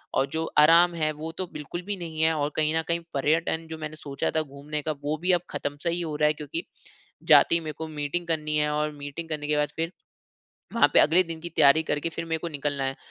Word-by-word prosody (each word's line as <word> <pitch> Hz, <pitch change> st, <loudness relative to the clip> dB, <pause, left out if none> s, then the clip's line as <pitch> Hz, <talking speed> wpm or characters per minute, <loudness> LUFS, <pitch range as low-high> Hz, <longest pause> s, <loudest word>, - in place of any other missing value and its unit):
और 135 Hz, -, +2 dB
जो 160 Hz, 0 st, -1 dB
आराम 170 Hz, +3 st, +6 dB
है 155 Hz, -2 st, 0 dB
वो 155 Hz, +2 st, -6 dB
तो 185 Hz, -, -3 dB
बिल्कुल 150 Hz, +4 st, -6 dB
भी 205 Hz, -1 st, -2 dB
नहीं 160 Hz, -3 st, -5 dB
है 160 Hz, 0 st, +4 dB
और 145 Hz, -2 st, -1 dB
कहीं 155 Hz, 0 st, +1 dB
न -, -, +2 dB
कहीं 170 Hz, 0 st, +1 dB
पर्यटन 160 Hz, +3 st, 0 dB
जो 160 Hz, -, -6 dB
मैंने 155 Hz, 0 st, -6 dB
सोचा 140 Hz, -3 st, -3 dB
था 160 Hz, -, +3 dB
घूमने 150 Hz, +1 st, -5 dB
का 155 Hz, -, -2 dB
वो 150 Hz, +2 st, -1 dB
भी 180 Hz, +2 st, +2 dB
अब -, -, -24 dB
खत्म-सा 145 Hz, +4 st, -3 dB
ही 170 Hz, +1 st, -1 dB
हो 160 Hz, -3 st, -3 dB
रहा 150 Hz, 0 st, +3 dB
है, 150 Hz, -, +3 dB
क्योंकि 155 Hz, -, -5 dB, 0.7 s
जाते -, -, +7 dB
ही -, -, +3 dB
मेरे 155 Hz, -1 st, -5 dB
को 160 Hz, -, -5 dB
मीटिंग 155 Hz, +3 st, -3 dB
करनी 155 Hz, -2 st, 0 dB
है 150 Hz, 0 st, +2 dB
और 150 Hz, 0 st, 0 dB
मीटिंग 145 Hz, +3 st, -6 dB
करने 150 Hz, -2 st, -3 dB
के 150 Hz, 0 st, +1 dB
बाद 150 Hz, 0 st, +1 dB
फिर, 165 Hz, +1 st, -2 dB, 0.8 s
वहाँ 230 Hz, -, +5 dB
पे -, -, +8 dB
अगले 170 Hz, +4 st, +5 dB
दिन 165 Hz, -1 st, -5 dB
की 170 Hz, -, -4 dB
तैयारी 150 Hz, 0 st, +5 dB
करके 150 Hz, +1 st, -1 dB
फिर 165 Hz, 0 st, -5 dB
मेरे 160 Hz, 0 st, -1 dB
को 170 Hz, -, -4 dB
निकलना 145 Hz, -2 st, -2 dB
है। 135 Hz, 0 st, -2 dB
155 Hz, 250 wpm, -26 LUFS, 150-165 Hz, 0.8 s, पे